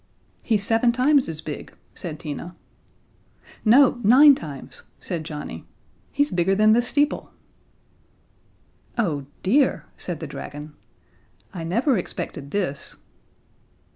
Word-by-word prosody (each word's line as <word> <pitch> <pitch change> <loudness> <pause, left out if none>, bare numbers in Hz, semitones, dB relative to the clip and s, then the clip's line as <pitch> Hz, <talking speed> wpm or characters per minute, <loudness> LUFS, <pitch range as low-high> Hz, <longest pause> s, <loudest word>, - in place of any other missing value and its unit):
"He's 215 -4 +1
seven 225 +2 +3
times 260 - +3
as 155 -1 -5
big," 150 - -7 0.2
said 160 -4 -6
Tina. 165 +3 -6 1.1
"No, 245 +2 +5
nine 275 +7 +8
times," 150 - -8 0.2
said 170 -4 -4
Johnnie. 150 -2 -7 0.4
"He's 285 +1 +1
bigger 180 +2 +2
than 215 +1 +5
the 240 - +4
steeple." 290 +4 0 1.7
"Oh, 150 - -1 0.2
dear," 265 +9 +2
said - - -4
the - - -5
dragon. 150 +1 -8 0.8
"I 170 - -5
never 230 - +1
expected 150 -4 -6
this." 180 -6 -2
200 Hz, 110 wpm, -23 LUFS, 155-245 Hz, 1.7 s, nine